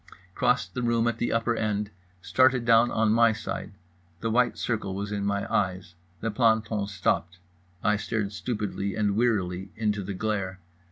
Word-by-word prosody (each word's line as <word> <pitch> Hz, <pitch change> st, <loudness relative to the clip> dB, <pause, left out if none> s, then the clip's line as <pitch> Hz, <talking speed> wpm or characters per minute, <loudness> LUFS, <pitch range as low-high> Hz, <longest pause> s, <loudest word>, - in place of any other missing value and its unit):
Crossed 95 Hz, -8 st, +1 dB
the 125 Hz, -, -3 dB
room 120 Hz, -1 st, +2 dB
at 115 Hz, -1 st, -1 dB
the 120 Hz, -, 0 dB
upper 115 Hz, +1 st, +1 dB
end. 105 Hz, -2 st, -1 dB, 0.3 s
Started 130 Hz, -2 st, +3 dB
down 115 Hz, +1 st, +5 dB
on 110 Hz, -1 st, +2 dB
my 115 Hz, 0 st, +5 dB
side. 110 Hz, -, -5 dB, 0.5 s
The 115 Hz, -, -1 dB
white 125 Hz, +2 st, +2 dB
circle 105 Hz, -5 st, -2 dB
was 100 Hz, +1 st, -4 dB
in 100 Hz, -1 st, -2 dB
my 100 Hz, 0 st, 0 dB
eyes. 95 Hz, -2 st, -1 dB, 0.3 s
The 115 Hz, -, -1 dB
planton 110 Hz, -2 st, +2 dB
stopped. 90 Hz, -2 st, -1 dB, 0.5 s
I 105 Hz, 0 st, +3 dB
stared 105 Hz, -1 st, -2 dB
stupidly 105 Hz, -3 st, -3 dB
and 105 Hz, -2 st, +1 dB
wearily 95 Hz, -5 st, 0 dB
into 105 Hz, -2 st, 0 dB
the 100 Hz, 0 st, -5 dB
glare. 100 Hz, -2 st, -2 dB
105 Hz, 165 wpm, -27 LUFS, 100-115 Hz, 0.5 s, down